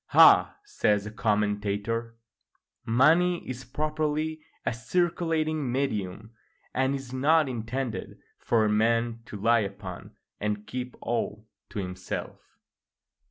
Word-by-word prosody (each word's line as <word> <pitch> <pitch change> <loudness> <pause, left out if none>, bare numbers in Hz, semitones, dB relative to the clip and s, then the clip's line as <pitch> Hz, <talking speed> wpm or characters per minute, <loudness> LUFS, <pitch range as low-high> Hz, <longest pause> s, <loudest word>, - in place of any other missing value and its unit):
["Ah!" - - +7
says 105 - +1
the 105 - -6
commentator, 105 +2 -1 0.7
"money 165 +9 +3
is 130 0 -5
properly 155 +3 -1 0.2
a - - +1
circulating 155 +2 0
medium, 110 -5 -2 0.4
and 130 +1 +1
is 135 -2 -7
not 150 +4 +4
intended 125 0 -4 0.2
for 110 -2 +2
a - - +3
man 115 +2 +2
to 105 - -7
lie 115 +3 +4
upon 100 -3 -6 0.2
and 105 0 -2
keep 125 +3 -5
all 110 -2 -2 0.2
to - - -8
himself." 90 -1 -5
115 Hz, 115 wpm, -27 LUFS, 105-145 Hz, 0.7 s, Ah